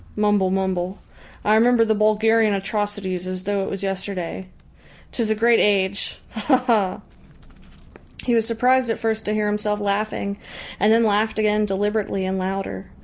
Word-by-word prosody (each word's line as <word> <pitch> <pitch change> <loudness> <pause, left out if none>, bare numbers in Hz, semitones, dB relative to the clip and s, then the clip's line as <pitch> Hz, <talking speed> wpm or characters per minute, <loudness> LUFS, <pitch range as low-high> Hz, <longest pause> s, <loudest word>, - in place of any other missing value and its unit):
Mumble, 210 -2 +2
mumble. 190 0 -1 0.5
I 210 - +4
remember 230 +1 +4
the 220 - +2
Bulgarian 215 0 +3
atrocities 195 -2 -3
as 185 0 -5
though 200 0 -1
it - - -4
was 195 0 -5
yesterday. 190 -2 -4 0.6
'Tis 230 -3 -1
a 220 - +2
great 230 +2 +4
age! 200 -1 +1
Ha 245 +5 +2
ha!" 215 -7 +1 1.2
He 245 - 0
was 225 -1 +2
surprised 250 +2 +2
at 225 - 0
first 220 -1 -2
to 210 - -1
hear 215 0 0
himself 210 0 -1
laughing, 200 0 -2 0.4
and 210 - +4
then 230 +1 +5
laughed 215 0 +1
again 215 0 +2
deliberately 200 0 -1
and 190 0 -2
louder. 185 - -4
210 Hz, 155 wpm, -22 LUFS, 195-220 Hz, 1.2 s, then